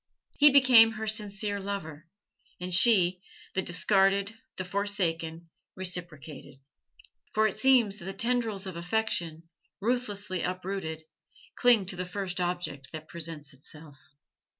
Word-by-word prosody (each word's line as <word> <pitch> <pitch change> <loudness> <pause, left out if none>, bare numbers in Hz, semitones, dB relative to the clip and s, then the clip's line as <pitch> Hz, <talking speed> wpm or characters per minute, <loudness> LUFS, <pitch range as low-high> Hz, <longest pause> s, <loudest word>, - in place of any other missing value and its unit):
He 295 0 +8
became 255 -5 +7
her 220 0 -5
sincere 210 -1 -1
lover; 170 -6 -6 0.5
and 180 0 -3
she, 185 -3 +5 0.3
the 190 - 0
discarded, 195 +3 +1 0.2
the 185 - -4
forsaken, 170 -4 -2 0.2
reciprocated; 170 -6 -3 0.8
for 215 0 +2
it 205 - -6
seems 245 -7 +3
that 170 - -11
the 195 - -5
tendrils 225 -2 -1
of 190 -2 -6
affection, 170 -3 -2 0.4
ruthlessly 205 -6 -2
uprooted, 180 -3 -4 0.5
cling 240 -5 +4
to 185 - -5
the 180 0 -4
first 185 -1 -4
object 175 -6 -3
that 155 0 -9
presents 160 -4 -8
itself. 145 +1 -13
190 Hz, 125 wpm, -28 LUFS, 170-210 Hz, 0.8 s, He